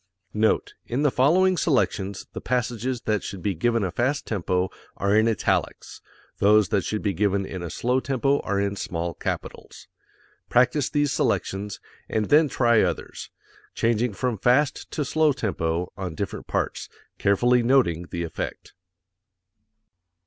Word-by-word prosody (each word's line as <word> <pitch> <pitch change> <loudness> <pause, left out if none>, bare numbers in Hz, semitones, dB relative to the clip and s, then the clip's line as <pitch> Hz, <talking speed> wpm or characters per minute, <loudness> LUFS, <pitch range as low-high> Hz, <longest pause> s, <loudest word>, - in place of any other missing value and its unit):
Note: 110 +1 +1
In 130 +5 -1
the 145 - +3
following 180 +9 +4
selections 100 - 0
the - - -6
passages 125 0 -2
that 105 -2 0
should 95 -3 -7
be 100 - 0
given 115 +6 +1
a 95 - -1
fast 130 - -1
tempo 90 -3 -1 0.3
are 100 +1 +1
in 110 +1 +4
italics; 110 -4 -1 0.4
those 105 0 +4
that 100 -3 +1
should 105 - -3
be 100 - 0
given 100 +1 +1
in 95 -1 -6
a 85 - -5
slow 125 - 0
tempo 135 +1 +1
are 100 0 -1
in 100 0 -1
small 85 -3 -3
capitals. - - -6 0.6
Practise 125 +3 +3
these 145 -2 +1
selections, 100 +1 -1 0.3
and 110 -2 -1
then 150 0 +5
try 120 -3 +3
others, 90 -3 -3 0.5
changing 115 0 +1
from 120 0 -2
fast 130 +5 +2
to 150 - -2
slow 155 +2 +2
tempo 90 -8 -2
on 90 -4 -5
different 100 +3 -5
parts, - - -2 0.3
carefully 120 +5 +3
noting 115 -10 +2
the 85 - -3
effect. 85 - -6
110 Hz, 150 wpm, -24 LUFS, 95-130 Hz, 0.6 s, then